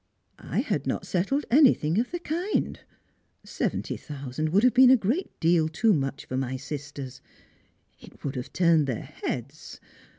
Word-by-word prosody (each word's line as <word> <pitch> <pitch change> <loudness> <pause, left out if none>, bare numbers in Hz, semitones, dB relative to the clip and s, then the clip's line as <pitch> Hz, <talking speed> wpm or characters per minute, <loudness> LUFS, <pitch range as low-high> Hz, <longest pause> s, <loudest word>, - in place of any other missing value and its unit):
" - - -43
I - - -2
had - - -2
not - - -2
settled 200 +11 0
anything 235 - +4
of 245 - 0
the 350 - -3
kind. 350 +4 -2 0.6
Seventy - - -3
thousand 140 +1 -5
would 195 +7 +3
have 255 - +5
been 255 0 +7
a 260 - +7
great 245 - -2
deal 165 -1 +3
too 215 +7 +2
much 135 -3 -2
for 130 - -4
my 130 0 -2
sisters; 140 -1 -7 0.8
it - - -16
would 140 -1 -3
have 125 -1 -5
turned 165 -5 +3
their 125 -5 -3
heads. 140 +5 -6
160 Hz, 165 wpm, -26 LUFS, -, 0.8 s, been